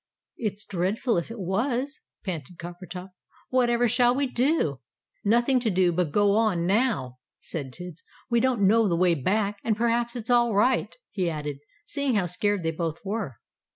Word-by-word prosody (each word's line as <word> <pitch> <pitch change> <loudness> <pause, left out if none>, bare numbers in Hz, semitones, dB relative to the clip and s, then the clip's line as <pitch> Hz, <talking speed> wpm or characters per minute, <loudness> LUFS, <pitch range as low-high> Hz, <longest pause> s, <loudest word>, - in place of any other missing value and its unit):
"It's 210 -2 -3
dreadful 200 +5 0
if 170 - -2
it 230 - -7
was!" 245 - -1 0.3
panted 170 -3 -5
Coppertop. 175 +2 -8 0.4
"Whatever 245 -1 +3
shall 245 +1 +3
we 280 +1 +1
do?" 250 - +1 0.4
"Nothing 240 +5 +3
to 235 -2 0
do 185 -2 +3
but 175 -1 0
go 205 +4 +3
on, 205 -5 +2
now," 190 - +1 0.2
said 140 -5 -5
Tibbs; 175 +2 -10 0.2
"we 235 -1 +2
don't 245 -4 +2
know 220 +1 +4
the 170 - +1
way 180 0 +4
back 200 +7 0
and 220 -2 0
perhaps 235 +1 +1
it's 240 0 -3
all 240 -3 +4
right," 250 +6 +2 0.2
he 185 -4 0
added, 150 -3 -4 0.3
seeing 280 -4 -1
how 200 -3 +2
scared 205 +2 0
they 165 - 0
both 165 -1 -3
were. 200 - -3
205 Hz, 170 wpm, -26 LUFS, 175-240 Hz, 0.4 s, know